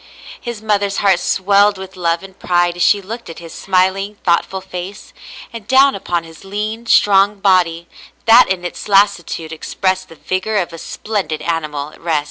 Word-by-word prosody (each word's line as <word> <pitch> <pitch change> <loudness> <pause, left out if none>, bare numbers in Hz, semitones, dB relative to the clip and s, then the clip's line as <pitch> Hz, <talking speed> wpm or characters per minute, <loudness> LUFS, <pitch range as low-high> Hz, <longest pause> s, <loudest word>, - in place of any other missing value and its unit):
His 235 -3 -6
mother's 200 -2 0
heart 195 -3 +3
swelled 200 +2 +2
with 190 0 -9
love 170 -1 -1
and 190 -1 -13
pride 175 -1 +1
as 175 - -6
she 200 +1 +3
looked 230 +3 -8
at 165 - -9
his 165 -1 -10
smiling, 195 +2 0
thoughtful 175 +2 +1
face, 185 +1 -8 0.4
and 225 -3 -9
down 270 +1 +5
upon 175 -3 -2
his 165 +1 -14
lean, 215 +4 -4
strong 200 -1 +4
body 175 -4 +2 0.4
that 230 0 +7
in 180 -2 -2
its 175 - -6
lassitude 195 -5 +1
expressed 185 +3 -2
the 165 - -13
vigor 185 +6 -2
of 175 -3 -2
a 165 - -8
splen 210 -1 -4
did 155 0 -4
animal 155 -3 -3
at - - -18
rest. 165 -2 +1
190 Hz, 180 wpm, -17 LUFS, 175-205 Hz, 0.4 s, that